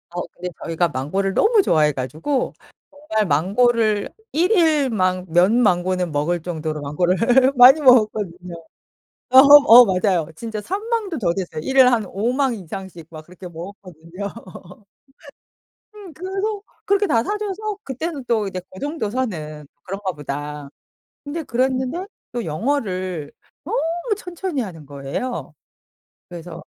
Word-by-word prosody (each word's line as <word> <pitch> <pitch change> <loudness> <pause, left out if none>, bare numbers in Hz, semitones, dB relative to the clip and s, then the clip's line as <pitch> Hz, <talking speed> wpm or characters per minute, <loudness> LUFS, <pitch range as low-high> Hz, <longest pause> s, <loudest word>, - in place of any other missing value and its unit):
어 175 - -2
근데 180 +1 -7
저희가 165 +1 0
망고를 190 +9 -2
너무 430 - +4
좋아해 155 - +2
가지고 155 - -3 0.4
정말 285 -8 -2
망고를 210 +7 +1 0.2
1 345 +5 +1
일 315 -8 +3
막 185 -4 0
몇 175 +5 +3
망고는 185 -6 +1
먹을 155 +4 -1
정도로 155 -3 -4
망고를 190 - +2
많이 255 +5 +8
먹었거든요. 210 - +2 0.8
어 260 - +4
어 275 -3 +9
맞아요. 185 -4 +1
진짜 220 +2 -6
3 390 - -4
망도 425 -8 -1
더 175 -6 0
됐어요. 170 -4 -5
1 265 - -3
일 260 -1 +8
한 225 -3 +1
5 210 +6 -2
망 265 -2 0
이상씩 185 -3 -9
막 155 -1 -10
그렇게 180 +1 -11
먹었거든요. 175 +1 -9 1.7
음 395 -6 -11
그래서 390 +4 -4 0.2
그렇게 400 +1 +2
다 230 -7 +2
사줘서 420 - -4
그때는 275 +1 -5
또 220 -3 +1
이제 185 -1 -5
'고 185 - -12
정도 290 -7 -3
선은 155 - -4 0.2
그런가 195 0 -4
보다.' 145 0 -6 0.6
근데 300 +3 -4
그랬는데 260 +7 -1 0.3
또 240 -1 -3
영어를 185 - -2 0.3
너무 350 - -2
천천히 360 -6 -4
하는 165 -8 -9
거예요. 140 - -5 0.8
그래서 175 -1 -9
210 Hz, 270 characters per minute, -21 LUFS, 175-280 Hz, 1.7 s, 어